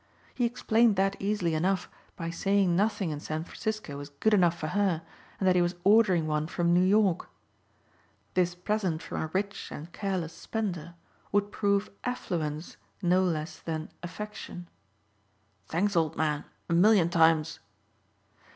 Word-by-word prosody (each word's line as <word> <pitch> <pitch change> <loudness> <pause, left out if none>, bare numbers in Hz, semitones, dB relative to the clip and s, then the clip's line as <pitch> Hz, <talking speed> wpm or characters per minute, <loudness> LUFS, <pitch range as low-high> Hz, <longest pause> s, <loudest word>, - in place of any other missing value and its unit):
He 245 - +1
explained 235 -2 +3
that 195 +1 +2
easily 195 -4 0
enough 180 +4 +1 0.3
by 165 0 -4
saying 195 0 +2
nothing 205 -3 +1
in 150 - -4
San 155 +1 -3
Francisco 215 -5 -4
was 145 +1 -7
good 145 +10 +1
enough 175 -4 +4
for 155 - -3
her 185 -3 +1 0.4
and 190 - +1
that 185 - +5
he 180 - +4
was 175 +1 0
ordering 195 -5 +5
one 150 0 0
from 170 +1 +1
New 175 - +5
York. 195 -1 +3 1.0
This 180 -1 +1
present 180 -3 -1
from - - -4
a 160 - -2
rich 200 +3 -2
and 160 +4 -8
careless 185 -5 -2
spender 175 -7 -4 0.4
would 205 0 +1
prove 200 0 +1
affluence 165 -10 -3 0.3
no 180 +1 +4
less 155 -3 -2
than 160 -1 -4
affection. 180 -1 -7 1.0
"Thanks, 195 +5 0
old 160 -3 +1
man, 150 -2 0 0.2
a 170 - -1
million 180 0 +5
times." 160 -1 +3
180 Hz, 150 wpm, -29 LUFS, 160-205 Hz, 1.0 s, that